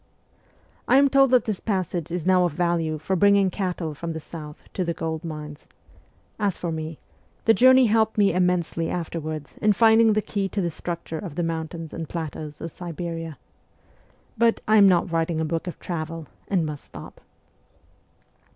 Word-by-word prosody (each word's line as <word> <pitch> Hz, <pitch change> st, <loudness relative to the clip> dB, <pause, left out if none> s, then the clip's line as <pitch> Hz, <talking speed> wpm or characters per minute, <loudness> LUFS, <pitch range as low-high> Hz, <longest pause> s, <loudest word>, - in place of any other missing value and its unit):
I 255 Hz, -, +5 dB
am 280 Hz, 0 st, +5 dB
told 275 Hz, 0 st, +5 dB
that 250 Hz, -1 st, +4 dB
this 215 Hz, -4 st, -2 dB
passage 185 Hz, -5 st, -2 dB
is 170 Hz, -1 st, -3 dB
now 185 Hz, -1 st, +4 dB
of 175 Hz, -, -1 dB
value 165 Hz, -2 st, 0 dB
for 160 Hz, +5 st, -2 dB
bringing 200 Hz, 0 st, +4 dB
cattle 180 Hz, -4 st, -3 dB
from 165 Hz, +3 st, -5 dB
the 160 Hz, -, -5 dB
south 150 Hz, -1 st, -10 dB
to 185 Hz, -, -1 dB
the 170 Hz, -1 st, -2 dB
gold 160 Hz, 0 st, -3 dB
mines; 150 Hz, -2 st, -7 dB, 0.7 s
as 200 Hz, -3 st, 0 dB
for 170 Hz, -, -3 dB
me, 160 Hz, 0 st, -5 dB, 0.5 s
the 225 Hz, -, +6 dB
journey 260 Hz, +2 st, +6 dB
helped 220 Hz, 0 st, +2 dB
me 200 Hz, -3 st, +4 dB
immensely 180 Hz, -2 st, 0 dB
afterwards 155 Hz, -3 st, -5 dB
in 210 Hz, 0 st, +4 dB
finding 225 Hz, +1 st, +5 dB
the 215 Hz, -, +2 dB
key 200 Hz, -2 st, -2 dB
to 205 Hz, -, -3 dB
the 170 Hz, -2 st, -1 dB
structure 170 Hz, -1 st, -5 dB
of 175 Hz, -7 st, -7 dB
the 175 Hz, -, -1 dB
mountains 165 Hz, 0 st, -4 dB
and 165 Hz, -2 st, -5 dB
plateaus 155 Hz, -2 st, -6 dB
of 165 Hz, -, -5 dB
Siberia 165 Hz, -2 st, -6 dB, 1.0 s
but 230 Hz, -1 st, +3 dB
I 215 Hz, +1 st, +5 dB
am 200 Hz, -2 st, +8 dB
not 175 Hz, -1 st, +2 dB
writing 165 Hz, 0 st, 0 dB
a 160 Hz, -, 0 dB
book 165 Hz, +3 st, -3 dB
of 175 Hz, -, -5 dB
travel, 165 Hz, -2 st, -5 dB, 0.2 s
and 180 Hz, -5 st, +1 dB
must 150 Hz, -2 st, -6 dB
stop. -, -, -12 dB
170 Hz, 180 wpm, -24 LUFS, 160-200 Hz, 1.0 s, am